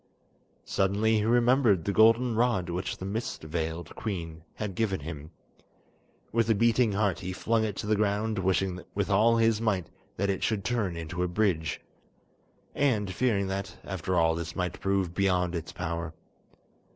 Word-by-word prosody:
Suddenly 105 +3 +2
he 105 - 0
remembered 120 - +3
the 100 - +1
golden 115 +3 +5
rod 110 -7 +1
which 90 +2 -3
the 95 - -6
mist 110 0 -4
veiled 80 +1 -4
queen 85 -6 -5
had 105 -3 -4
given 95 -3 -1
him. 75 0 -7 1.0
With 115 0 +1
a 110 - +4
beating 115 0 +3
heart 100 -1 +1
he 95 0 -5
flung 115 +4 +1
it 105 -3 -2
to - - -5
the 105 +1 +2
ground, 105 +1 0
wishing 95 -1 0
with 100 0 -1
all 115 +4 +4
his 115 -1 +3
might 100 -6 0 0.3
that 100 +1 +1
it 95 - -3
should 105 -4 -1
turn 100 -5 -1
into 85 +2 -4
a 90 - +1
bridge, 90 -5 0 0.9
and 105 -9 +1
fearing 105 -2 +1
that, 100 +1 -4
after 95 -1 -3
all, 80 -1 +4
this 85 +1 -5
might 90 -1 -2
prove 95 -3 0
beyond 90 -2 +1
its 85 -1 -4
power. 85 -2 -4
100 Hz, 165 wpm, -28 LUFS, 90-110 Hz, 1.0 s, golden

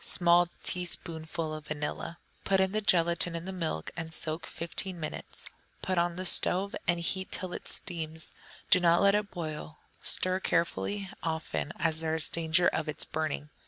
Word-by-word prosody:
Small 175 0 +4
teaspoonful 165 -3 -1
of 155 -1 -7
vanilla. 155 +2 -3 0.3
Put 195 - +3 0.2
the 215 - +1
gelatine 170 -2 +3
in 165 +1 -4
the 190 - -4
milk 160 - -2
and 165 -2 -5
soak 160 +1 -2
fifteen 175 +2 -5
minutes; 155 - -6 0.4
put 185 -2 +1
on 170 0 +1
the 185 +1 -4
stove 190 +2 +1
and 175 -1 +3
heat 190 +2 0
till 185 -1 -3
it - - -5
steams, 160 -1 +1 0.3
but - - -30
do 185 - +8
not 170 +1 +4
let 200 0 +6
it 210 -1 +1
boil; 155 -3 -6 0.2
stir 185 0 +2
carefully 190 +3 0
often, 160 -2 -2
as 160 -1 +1
there 160 0 0
is 160 - +2
danger 165 +1 +3
of - - 0
its 150 - -3
burning. 155 -1 -3
170 Hz, 170 wpm, -30 LUFS, 160-180 Hz, 0.4 s, do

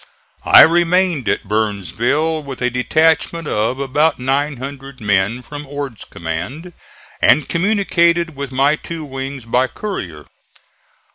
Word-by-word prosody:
I - - +9
remained 175 - +2
at - - -1
Burnsville 110 - 0
with 140 -2 -8
a 125 0 0
detachment 160 +5 +1
of 110 +4 -1
about 145 +3 +1
900 135 0 -3
men 105 +3 0
from 145 +3 -9
Ord's 140 -6 -6
command 90 - -6 0.5
and 150 +2 +4
communicated 170 -3 +1
with 140 -1 -5
my 140 +3 +2
two 165 -1 -7
wings 135 -2 -6
by 125 +3 +1
courier. 90 - -6
140 Hz, 120 wpm, -18 LUFS, 125-160 Hz, 0.5 s, I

